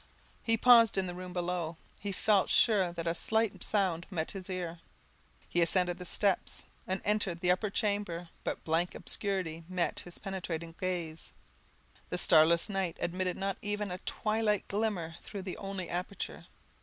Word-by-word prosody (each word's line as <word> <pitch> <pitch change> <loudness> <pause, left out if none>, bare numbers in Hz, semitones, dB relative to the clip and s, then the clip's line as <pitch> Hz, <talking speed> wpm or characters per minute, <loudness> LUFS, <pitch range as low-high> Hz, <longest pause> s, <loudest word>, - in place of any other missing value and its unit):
He 225 -1 +2
paused 230 -3 +7
in 190 - +2
the 180 - -4
room 180 0 -7
below; 175 -2 -2 0.2
he 205 - -3
felt 200 0 +3
sure 195 -6 +4
that 170 -1 -5
a 165 - +2
slight 220 0 0
sound 185 -5 0
met 165 -5 -2
his 195 -1 -7
ear. 175 -2 -3 0.7
He 175 - +1
ascended 175 +1 +2
the 180 - -6
steps, 195 +1 0 0.2
and 190 +1 -2
entered 205 -4 +1
the 180 0 +3
upper 195 +4 +1
chamber; 200 -5 -1
but - - -3
blank 165 +2 +1
obscurity 185 -5 -2
met 180 -2 0
his 175 - -7
penetrating 170 -4 -4
gaze, 170 -4 -3 0.8
the 180 - -1
starless 170 -1 +5
night 195 -5 -1
admitted 180 +1 -1
not 195 0 -1
even 205 -1 -2
a 180 - -4
twilight 215 -1 0
glimmer 200 -6 -1
through 200 -2 -7
the 185 -1 -4
only 195 -3 -4
aperture. 180 +4 -4
185 Hz, 160 wpm, -32 LUFS, 175-200 Hz, 0.8 s, paused